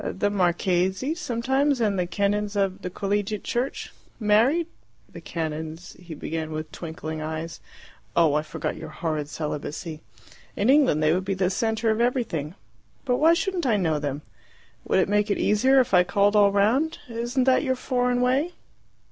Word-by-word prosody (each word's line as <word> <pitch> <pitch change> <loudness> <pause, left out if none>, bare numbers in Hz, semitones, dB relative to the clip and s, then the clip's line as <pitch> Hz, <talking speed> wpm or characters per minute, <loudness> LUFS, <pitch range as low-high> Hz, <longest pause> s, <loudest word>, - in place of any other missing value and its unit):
"The 205 +2 -1
marchese, 185 - +1
sometimes, 270 -2 0
and 205 -4 +1
the 180 - 0
canons 205 +2 -1
of 195 -2 0
the 180 - -4
Collegiate 205 +2 -2
Church." 245 +3 -3 0.3
"Married?" 230 +10 +3 0.4
"The - - -11
canons 160 +1 -5
" - - -22
he 170 -3 -9
began 160 +1 -4
with 155 0 -5
twinkling 160 -1 -6
eyes. 160 +1 -5 0.6
"Oh, 160 -3 +4
I 150 - +2
forgot 155 - -4
your 160 - -8
horrid 155 -2 -3
celibacy. 155 +1 -5 0.5
In 215 +6 +3
England 270 - +4
they 155 +1 +4
would 185 +2 0
be 195 0 -2
the 185 -1 +1
centre 220 +2 0
of 220 +1 0
everything. 215 - -1 0.5
But 250 -2 +1
why 325 +4 +5
shouldn't 360 -4 -1
I 220 -4 +3
know 160 -6 0
them? 145 0 -4 0.6
Would - - +1
it 190 - +3
make 210 +1 +1
it 200 - +1
easier 260 +6 +4
if 250 -6 +1
I 180 -1 +7
called 200 +3 +2
all 205 -1 +6
round? 240 +11 +2
Isn't 240 +2 -1
that 260 0 +4
your 260 -3 +1
foreign 250 -1 0
way?" 270 +8 +1
200 Hz, 175 wpm, -25 LUFS, 165-245 Hz, 0.6 s, I